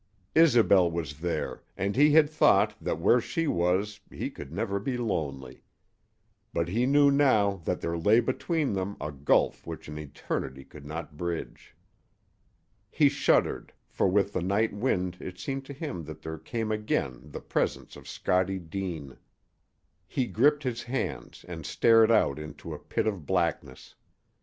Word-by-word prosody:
Isobel 115 - +5
was 80 -4 -5
there, 85 +1 -3 0.2
and 100 +2 -1
he 145 +3 +6
had 155 -1 +7
thought 155 +1 +4
that - - -2
where 120 +9 +4
she 165 +7 -2
was 95 - 0
he - - -5
could 70 - -10
never 100 +2 -2
be 125 +5 -2
lonely. 75 - -3 0.9
But 85 0 -1
he 120 +7 +1
knew 145 +1 +5
now 110 -9 +3
that - - -1
there 85 - -2
lay 105 +7 +5
between 145 - -1
them 95 +1 -3
a 75 - -4
gulf 70 0 +1
which - - -7
an 75 +1 -6
eternity 70 -2 -5
could 70 -1 -13
not 80 0 -7
bridge. 85 0 -5 1.1
He 145 -3 +4
shuddered, 140 0 +1 0.2
for - - +1
with 100 +1 +2
the - - -1
night 100 +5 +1
wind 95 -5 -1
it 90 -1 -8
seemed 135 +8 -4
to 140 - -8
him 140 - -5
that 80 - -10
there 80 0 -6
came 110 +3 -3
again 70 - -1
the - - -7
presence - - -2
of - - -13
Scottie 95 +1 0
Deane. 85 -6 -6 0.9
He 130 - -1
gripped 145 +5 +2
his 120 -3 -2
hands 130 +2 -4
and 85 -3 -7
stared 115 +6 +4
out 75 -10 +3
into 75 -1 -8
a - - -7
pit - - -2
of 100 -9 -3
blackness. 65 - -2
100 Hz, 160 wpm, -28 LUFS, 80-120 Hz, 1.1 s, had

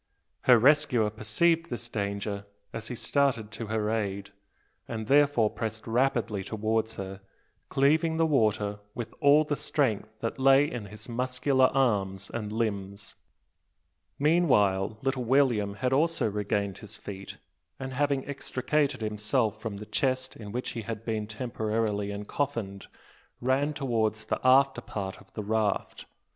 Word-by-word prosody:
Her 125 -2 +8
rescuer 130 -4 +4
perceived 160 +11 +1
this 120 -1 -4
danger 100 -2 -3 0.3
as 115 -1 -4
he 125 - -4
started 125 -5 +1
to 115 +1 -6
her 110 0 -1
aid; 100 -3 -2 0.6
and 110 -2 -4
therefore 140 -4 +4
pressed 110 -1 -4
rapidly 115 -4 +1
towards 110 +2 -1
her, 95 0 -6 0.5
cleaving 160 +4 +3
the 165 - +3
water 105 -8 +1 0.2
with 120 - -5
all 145 +1 +6
the 150 -1 -1
strength 110 -7 -1
that 115 +3 -3
lay 135 +1 +6
in 120 -7 -5
his 105 +2 -10
muscular 130 +2 +2
arm 105 -9 +1 0.2
and 105 -3 -3
limbs. 100 -3 -3 1.0
Meanwhile 110 - +3
little 135 -1 0
William 120 -6 +2
had 130 +3 0
also 165 -1 +2
regained 100 -1 -1
his 105 +1 -9
feet; 100 -1 -8 0.4
and, 130 0 -5
having 140 0 0
extricated 140 0 -1
himself 105 +1 0
from 110 -3 -4
the 105 - -8
chest 130 +2 -1
in 105 -2 -9
which 125 +3 -3
he 115 - -4
had 110 0 -6
been 110 -2 -2
temporarily 110 -2 -2
encoffined, 105 -1 -3 0.5
ran 135 +4 +1
towards 110 -6 0
the - - -1
after 135 0 +5
part 95 -5 -5
of 95 -2 -20
the 105 - -3
raft. 110 -1 -1
115 Hz, 140 wpm, -28 LUFS, 105-135 Hz, 1.0 s, Her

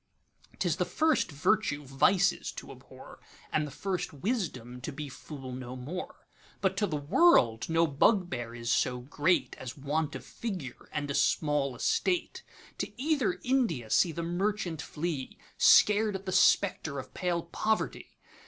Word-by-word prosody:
'T - - 0
is - - 0
the - - +2
first 315 - +1
virtue 145 -1 +1
vices 175 +9 +2
to - - -9
abhor, - - -13 0.3
And 150 -1 +1
the - - -7
first 185 +3 -3
wisdom 145 - -3
to 155 - -5
be 145 +1 -6
fool 135 -1 -9
no 125 0 -6
more:But 180 +6 -5
to 205 0 +1
the 160 - -3
world 145 - +4
no 165 +1 +3
bugbear 140 - +1
is 115 -1 -3
so 125 -1 +1
greatAs 145 -2 -1
want 145 +2 -2
of - - -7
figure 180 - -6
and 145 -1 -3
a - - -1
small 140 -1 +1
Estate.To 355 - -2
either 260 - +1
India 225 - 0
see 175 - +4
the 170 +2 -4
merchant 175 -2 -1
fly, 150 -3 -4 0.2
Scared 210 0 +5
at 190 +1 -6
the 185 - -3
spectre 180 -6 +3
of 130 - -7
pale 175 -2 -1
Poverty! 215 +6 -2
160 Hz, 145 wpm, -30 LUFS, 135-195 Hz, 0.3 s, Scared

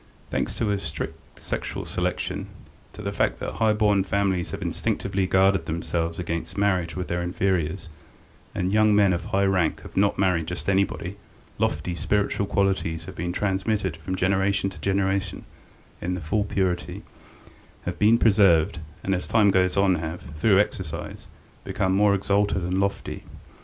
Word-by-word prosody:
Thanks - - -1
to 110 -3 0
a 100 - 0
strict 80 -5 -7
sexual - - -4
selection, - - -2 0.5
to - - -9
the - - -2
fact - - 0
that - - -3
high 110 -1 +3
born 105 -2 +3
families 95 -2 0
have 100 0 -5
instinctively 95 +3 -1
guarded 95 0 +3
themselves 85 0 -2
against 85 -1 -4
marriage 95 -4 +1
with 90 -1 -3
their 85 0 -1
inferiors, 90 -1 -1 0.7
and 90 +2 -1
young 110 -1 +5
men 100 -2 +5
of 85 -1 -3
high 100 0 +1
rank 95 -4 +1
have - - -12
not 100 +1 +2
married 90 -4 +1
just 90 - -5
anybody, 95 -1 0 0.4
lofty, 75 +4 0
spiritual 100 +4 0
qualities 95 -5 0
have 95 - -9
been 85 +2 -2
transmitted 95 -1 -1
from 85 +3 -4
generation 95 +1 +1
to - - -12
generation 95 -1 0 0.6
in 90 +1 -1
their 90 - -6
full 100 +7 0
purity, 95 -3 -2 0.8
have - - -4
been 110 +2 +5
preserved, 95 -6 +4 0.2
and 95 - 0
as 90 - -2
time 105 -3 +4
goes 95 0 +2
on 100 -1 +4
have, 80 0 -4
through 95 +6 +4
exercise, 90 -5 -2 0.4
become 95 -1 0
more 100 +1 +4
exalted 100 -1 +1
and 90 +2 0
lofty. 100 0 -2
95 Hz, 160 wpm, -25 LUFS, 85-100 Hz, 0.8 s, young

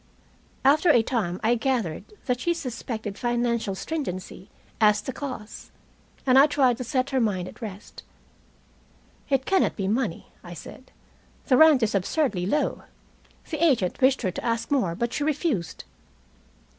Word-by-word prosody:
After 300 +5 +5
a 240 -7 +5
time 200 -8 -2
I 225 +2 +3
gathered 230 -9 -1 0.2
that 250 -3 0
she 345 +5 0
suspected 230 -7 -5
financial 235 -4 0
stringency 190 - -5 0.3
as 210 -1 +5
the 265 - -5
cause, 255 -7 -7 0.6
and 260 0 +6
I 285 - +7
tried 270 -5 +2
to 255 - -4
set 260 +2 -1
her 265 - +2
mind 195 -6 0
at - - -12
rest. 210 -1 -8 1.3
"It 270 -1 +1
cannot 385 -1 +2
be 195 -3 -2
money," 215 -4 -2
I 175 0 -9
said. 255 - -12 0.5
"The 255 - +3
rent 310 -5 +6
is 220 - +1
absurdly 195 - 0
low. 295 +8 0 0.7
The 310 0 -1
agent 250 - +2
wished 265 +1 +3
her 185 - 0
to - - -7
ask 230 +1 -2
more, 235 -12 +1
but 235 +5 -2
she 290 - -1
refused." 290 - -1
240 Hz, 155 wpm, -25 LUFS, 205-275 Hz, 1.3 s, I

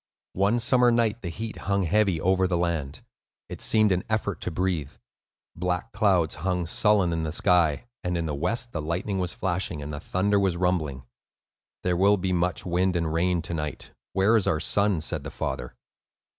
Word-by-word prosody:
One 100 +5 +2
summer 125 +1 +4
night 115 -1 +1
the 85 - -4
heat 110 +6 -6
hung 100 -1 +2
heavy 95 0 +2
over 95 +2 +2
the 90 -1 0
land. 80 -5 -2 0.5
It - - -7
seemed 110 -2 +3
an 90 0 +1
effort 110 -2 -1
to - - -2
breathe. 85 -5 -2 0.6
Black 90 0 -2
clouds 90 -8 +2
hung 90 -1 -1
sullen 95 0 +3
in 80 - -1
the 80 -1 -2
sky, 85 +1 +2 0.2
and 90 -1 -1
in 85 - -2
the 75 - -2
west 115 +11 -2
the 80 - -3
lightning 90 +5 -2
was 90 -1 -2
flashing 90 -3 -2
and 75 +1 -6
the 75 - -5
thunder 100 +5 +1
was 95 -3 +1
rumbling. 80 -7 -1 0.8
"There 90 -1 +1
will 100 +3 +4
be 95 0 -1
much 90 0 -1
wind 90 +1 +1
and 85 -2 -1
rain 85 0 +1
to 85 - -5
night. 75 -2 -4 0.2
Where 100 +4 +3
is 110 - +3
our 80 - +2
son?" 100 0 +2
said - - -3
the - - -6
father. 65 -2 -5
90 Hz, 190 wpm, -26 LUFS, 85-100 Hz, 0.8 s, summer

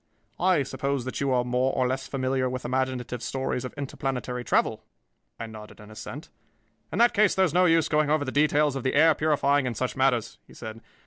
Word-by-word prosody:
I 180 -5 +3
suppose 135 -1 -3
that 130 - -4
you 140 - +1
are 125 -1 +2
more 125 +2 0
or 130 - +1
less 130 +1 -3
familiar 130 -1 -1
with 130 0 -5
imaginative 130 -1 -2
stories 130 -1 -2
of 130 - -5
interplanetary 130 -3 -4
travel?" - - +1 0.6
I 115 - -4
nodded 110 -1 -11
an 105 0 -13
assent. 130 +7 -8 0.6
"In - - -3
that 235 +1 +5
case 210 -1 +3
there 190 - +4
is 170 - -2
no 180 +1 +4
use 165 -2 +4
in - - -6
going 150 -1 +2
over 150 -1 +1
the 130 - -3
details 145 0 +2
of 135 - -3
the 130 +2 -1
air 160 +2 +6
purifying 145 -3 +1
and 120 -3 -4
such 130 +1 -2
matters," 125 -4 0
he - - -16
said. 110 +1 -8
130 Hz, 215 wpm, -26 LUFS, 125-150 Hz, 0.6 s, air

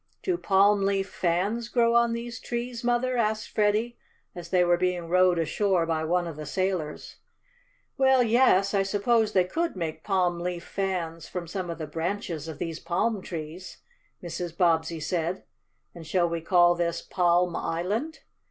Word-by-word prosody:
"Do 370 - +1
palm 200 - +3
leaf 195 0 0
fans 200 +7 -1
grow 235 -1 +3
on 235 0 +3
these 235 0 -5
trees, 240 0 -4
Mother?" 245 +1 +1
asked 220 -1 0
Freddie 215 +3 +1 0.3
as 175 -1 -9
they 180 -1 +3
were 175 0 +4
being 180 -1 -1
rowed 185 0 +4
ashore 175 +2 +1
by 160 -1 -1
one 175 +2 +1
of 165 -3 -7
the 155 - -6
sailors. 185 -3 -3 0.8
"Well, 265 -1 +5
yes, 220 -5 +3
I 200 - +3
suppose 210 +3 +1
they 185 - +4
could 330 - -2
make 160 -3 -4
palm 180 -3 +1
leaf 175 0 -4
fans 170 -4 -3
from 180 -2 -5
some 180 +1 -5
of 170 - -4
the 160 - -4
branches 165 0 -4
of 160 -3 -7
these 165 +1 -4
palm 190 +5 -1
trees," 170 +1 -7 0.5
Mrs. 170 0 -5
Bobbsey 165 -2 +2
said. 170 +3 -2 0.5
"And 165 -3 -11
shall 175 0 +2
we 170 0 -3
call 175 +1 +4
this 170 -1 -2
Palm 175 -1 +2
Island? 210 - -2
180 Hz, 165 wpm, -27 LUFS, 170-215 Hz, 0.8 s, Well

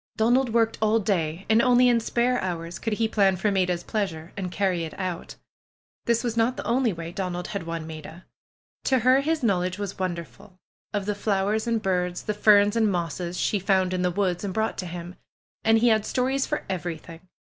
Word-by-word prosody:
Donald 245 +3 +3
worked 225 -1 +1
all 215 +1 +3
day 185 -4 -1
and 220 +1 +4
only 250 0 +5
in 240 -1 +4
spare 240 +2 0
hours 170 -2 -4
could 225 - -2
he 225 +1 +1
plan 200 -3 +3
for 205 +3 0
Maida's 180 -3 0
pleasure 180 -6 -3
and 185 -3 -4
carry 185 -3 0
it 160 - -6
out. 185 -3 -4 0.7
This 235 0 +2
was 235 -2 -2
not 230 +2 +1
the - - -5
only 245 0 +2
way 165 -1 -6
Donald 180 -1 -4
had 200 -5 -5
won 165 -1 -4
Maida. 160 +2 -9 0.6
To 265 - +3
her 255 +3 +4
his 310 0 -1
knowledge 185 -4 +1
was 205 -1 -5
wonderful 175 - -5 0.2
— - - -74
of 205 -2 -2
the 210 - 0
flowers 205 +2 0
and 230 -1 +1
birds, 180 -2 -1
the 210 - -2
ferns 205 0 +5
and 220 -3 +3
mosses 175 0 -3
she 205 - +1
found 190 -1 +1
in 180 - -1
the 180 - +2
woods 180 -1 -1
and 195 -2 -4
brought 220 0 -1
to 185 - -3
him. 175 +1 -7 0.5
And 225 0 +5
he 235 +2 +4
had 215 -2 +3
stories 265 +3 0
for 300 - -3
every 175 -3 -3
thing. 165 +1 -12
195 Hz, 210 wpm, -25 LUFS, 180-225 Hz, 0.7 s, only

